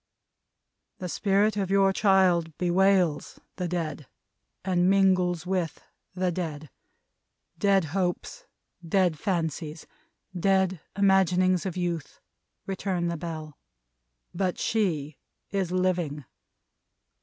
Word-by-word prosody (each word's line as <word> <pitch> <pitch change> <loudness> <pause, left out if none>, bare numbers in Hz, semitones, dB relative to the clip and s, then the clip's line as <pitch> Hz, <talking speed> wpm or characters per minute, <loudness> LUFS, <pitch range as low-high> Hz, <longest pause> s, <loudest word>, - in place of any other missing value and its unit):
"The 180 - -5
Spirit 205 +3 +1
of 195 -2 -1
your 195 0 +4
child 185 -6 +3
bewails 180 -3 +2 0.2
the 180 - -2
dead, 160 -5 -3 0.6
and 180 -1 +2
mingles 185 -3 +3
with 180 -3 -2 0.4
the 185 -1 0
dead 155 -4 -5 0.9
dead 195 -3 +3
hopes, 195 - -2 0.4
dead 170 -2 +1
fancies, 160 -3 -2 0.5
dead 190 -1 +1 0.2
imaginings 185 -2 +3
of 185 - -5
youth," 170 -4 -3 0.5
returned 185 -3 -2
the - - -2
Bell, 155 -2 -7 0.7
"but 180 0 -1
she 160 -10 -1 0.3
is 195 -3 -1
living. 175 -6 -1
180 Hz, 100 wpm, -27 LUFS, 165-190 Hz, 0.9 s, your